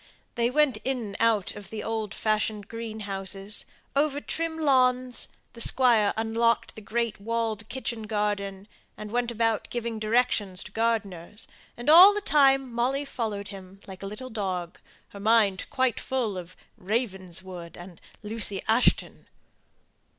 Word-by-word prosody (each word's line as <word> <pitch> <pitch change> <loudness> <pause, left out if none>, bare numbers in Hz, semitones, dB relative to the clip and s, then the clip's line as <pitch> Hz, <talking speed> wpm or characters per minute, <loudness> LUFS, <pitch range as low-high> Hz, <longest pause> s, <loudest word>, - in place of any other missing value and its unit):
They 235 -1 +1
went 280 -3 +3
in 265 +4 -1
and 205 -4 -6
out 225 -4 +2
of 200 -3 -10
old 220 -1 -3
fashioned 215 -1 -1
greenhouses, 205 -3 -3 0.3
over 285 0 +2
trim 325 +2 -3
lawns, 255 -4 +2 0.3
the 235 - -7
Squire 230 -5 +4
unlocked 225 +1 +1
the 220 - -10
great 230 0 -2
walled 225 -1 -2
kitchen 235 -4 -4
garden, 205 -2 -2 0.3
and 210 -1 -7
went 240 0 0
about 225 -2 0
giving 235 -2 -3
directions 215 -4 +1
to 210 - -11
gardeners; 210 -4 -2 0.3
and 240 +3 -8
all 360 +7 +10
the - - +1
time 270 - +3
Molly 260 +4 0
followed 215 -6 -4
him 195 -1 -11
like 190 -1 -10
a 195 - -5
little 250 +6 -7
dog, 185 -5 -3 0.3
her 200 - -11
mind 210 -2 +3
quite 260 -3 +1
full 245 -6 -1
of 180 -1 -8 0.2
"Ravenswood" 185 -5 -4
and 175 -1 -12 0.2
"Lucy 210 -2 -1
Ashton." 225 +3 +2
220 Hz, 140 wpm, -27 LUFS, 200-245 Hz, 0.3 s, all